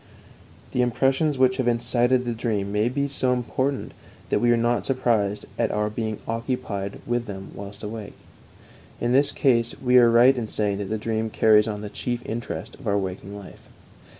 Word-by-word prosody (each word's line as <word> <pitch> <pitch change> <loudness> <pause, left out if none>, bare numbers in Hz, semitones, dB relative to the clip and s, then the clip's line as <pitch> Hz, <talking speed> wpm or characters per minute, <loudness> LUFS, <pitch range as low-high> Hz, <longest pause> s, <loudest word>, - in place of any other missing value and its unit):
The 125 - +1
impressions 135 +4 +1
which 130 0 +3
have 130 -3 0
incited 120 +1 +2
the 120 - -1
dream 105 -3 -2
may 105 +3 +1
be 140 +2 -1
so 130 -2 +1
important 130 +2 -2 0.4
that - - +2
we 120 - +3
are 120 - +4
not 120 +1 +1
surprised 115 -6 0
at - - +2
our 105 0 -1
being 110 -1 -3
occupied 115 -4 -3
with 120 0 -1
them 95 -1 -7
whilst 100 +1 -9
awake; 105 -1 -7 0.8
in 120 - 0
this 140 +3 +4
case 120 -4 +2
we 125 -1 +5
are 120 -1 +6
right 120 +3 +6
in 120 -3 -3
saying 105 -2 -1
that 100 - -3
the 110 - -1
dream 110 0 -2
carries 110 0 +4
on 105 -1 -4
the 105 - -5
chief 120 +3 -4
interest 110 -5 -5
of 125 - -10
our 100 0 +2
waking 95 +1 -5
life. 100 -3 -13
115 Hz, 185 wpm, -24 LUFS, 105-125 Hz, 0.8 s, are